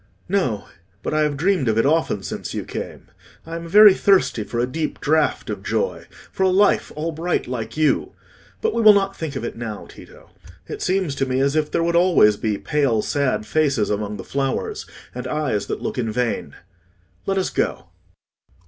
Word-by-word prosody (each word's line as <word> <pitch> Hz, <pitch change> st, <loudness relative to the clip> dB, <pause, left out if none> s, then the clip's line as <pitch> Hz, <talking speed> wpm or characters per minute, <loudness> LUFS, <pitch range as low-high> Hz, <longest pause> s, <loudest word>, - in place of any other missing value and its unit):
"No; 175 Hz, -, -1 dB, 0.4 s
but -, -, -2 dB
I 155 Hz, -, +2 dB
have 150 Hz, -2 st, 0 dB
dreamed 175 Hz, -4 st, +1 dB
of 110 Hz, -1 st, +1 dB
it 115 Hz, -, +3 dB
often 145 Hz, -9 st, +1 dB
since -, -, -5 dB
you -, -, -3 dB
came. -, -, -7 dB, 0.4 s
I 165 Hz, +1 st, -6 dB
am 170 Hz, 0 st, -6 dB
very 205 Hz, +3 st, +8 dB
thirsty 190 Hz, -, +2 dB
for 120 Hz, -, -6 dB
a 120 Hz, -, +2 dB
deep 155 Hz, +5 st, -4 dB
draught 155 Hz, +1 st, +1 dB
of -, -, -5 dB
joy—for 475 Hz, -, -4 dB
a 190 Hz, -, +4 dB
life 195 Hz, +2 st, +3 dB
all 160 Hz, +2 st, -2 dB
bright 165 Hz, +3 st, -1 dB
like 115 Hz, 0 st, -5 dB
you. 155 Hz, -1 st, +1 dB, 0.5 s
But 445 Hz, 0 st, 0 dB
we -, -, 0 dB
will 215 Hz, -1 st, +9 dB
not 195 Hz, -1 st, 0 dB
think 155 Hz, -3 st, -5 dB
of 130 Hz, -, -4 dB
it -, -, -5 dB
now, 110 Hz, -3 st, -6 dB
Tito; -, -, -15 dB, 0.4 s
it -, -, -7 dB
seems 185 Hz, -5 st, 0 dB
to 135 Hz, -1 st, -1 dB
me 130 Hz, 0 st, 0 dB
as 140 Hz, +2 st, +1 dB
if 155 Hz, -1 st, +1 dB
there 165 Hz, -, 0 dB
would 170 Hz, 0 st, 0 dB
always 170 Hz, -, +5 dB
be 105 Hz, 0 st, -2 dB
pale 135 Hz, -7 st, 0 dB
sad 130 Hz, -7 st, 0 dB
faces 135 Hz, -4 st, +1 dB
among 105 Hz, 0 st, -2 dB
the -, -, -7 dB
flowers, 135 Hz, -1 st, -3 dB, 0.3 s
and 125 Hz, -, -5 dB
eyes 145 Hz, -10 st, -1 dB
that -, -, -4 dB
look -, -, -3 dB
in 115 Hz, -2 st, -1 dB
vain. 120 Hz, +1 st, -2 dB, 0.7 s
Let 195 Hz, 0 st, 0 dB
us 190 Hz, -, 0 dB
go." -, -, -2 dB
150 Hz, 195 wpm, -21 LUFS, 120-175 Hz, 0.7 s, will